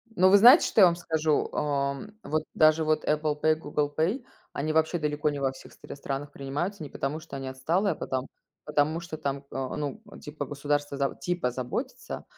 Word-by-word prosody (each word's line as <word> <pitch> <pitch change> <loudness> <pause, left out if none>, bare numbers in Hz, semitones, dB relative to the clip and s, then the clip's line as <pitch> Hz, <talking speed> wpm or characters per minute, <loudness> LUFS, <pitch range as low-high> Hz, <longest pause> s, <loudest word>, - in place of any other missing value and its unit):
Ну, 185 0 +5
вы 200 - +8
знаете, 245 - +8
что 215 - +3
я - - +11
вам 170 -1 +4
скажу? 160 -3 0
Эм, 140 +8 -2
вот 155 0 -1
даже 155 0 +4
вот 155 0 +1
Apple 150 0 0
Pay 155 - +4
и - - -3
Google 145 -1 -2
Pay- 195 - 0 0.3
они 155 +2 -2
вообще 160 +2 +2
далеко 150 0 0
не 145 -1 -4
во 135 -1 +1
всех 130 - -14
стр - - -10
странах 140 +1 -5
принимаются, 155 +7 -4
не 145 - -7
потому, 140 +5 -3
что 155 -3 -10
они 135 -1 -5
отсталые, 165 +10 0
а - - -12
потом 130 0 -3 0.4
потому 150 +2 +1
что 165 -2 -7
там, 140 -2 -3
а, 135 -1 -3
ну, 150 +8 -4 0.2
типа 150 0 -6
государство 145 0 -2
заб 140 -1 -1
типа 175 -8 -1
заботится. 130 - -5
150 Hz, 205 wpm, -27 LUFS, 140-165 Hz, 0.4 s, я